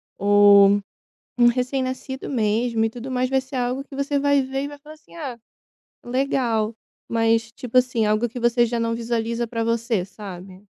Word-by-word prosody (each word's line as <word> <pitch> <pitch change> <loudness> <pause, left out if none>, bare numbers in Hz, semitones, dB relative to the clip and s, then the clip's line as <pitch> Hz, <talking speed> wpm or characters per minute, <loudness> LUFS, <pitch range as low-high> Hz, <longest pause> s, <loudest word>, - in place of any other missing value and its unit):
ou 205 0 +6 0.6
um 240 - +7
recém 250 +2 0
nascido 260 +1 -5
mesmo 225 -1 0
e 225 - +1
tudo 245 +3 -8
mais, 255 0 0
vai 265 0 +2
ser 265 +1 -9
algo 250 +2 -1
que 275 - -11
você 280 +1 0
vai 285 0 +3
ver 270 +1 -3
e 285 - -3
vai 290 - -10
falar 305 +2 -13
assim: 310 - -20
"Ah, 270 -7 -6 0.7
legal", 240 -4 0 0.3
mas 225 0 +1
tipo 250 +1 -1
assim, 245 -3 +1
algo 215 +3 +1
que 245 - -8
você 240 0 +3
já 235 0 -2
não 230 0 0
visualiza 230 0 -2
para 230 0 -3
você, 230 -4 0
sabe. 190 -1 -10
240 Hz, 185 wpm, -23 LUFS, 225-260 Hz, 0.7 s, um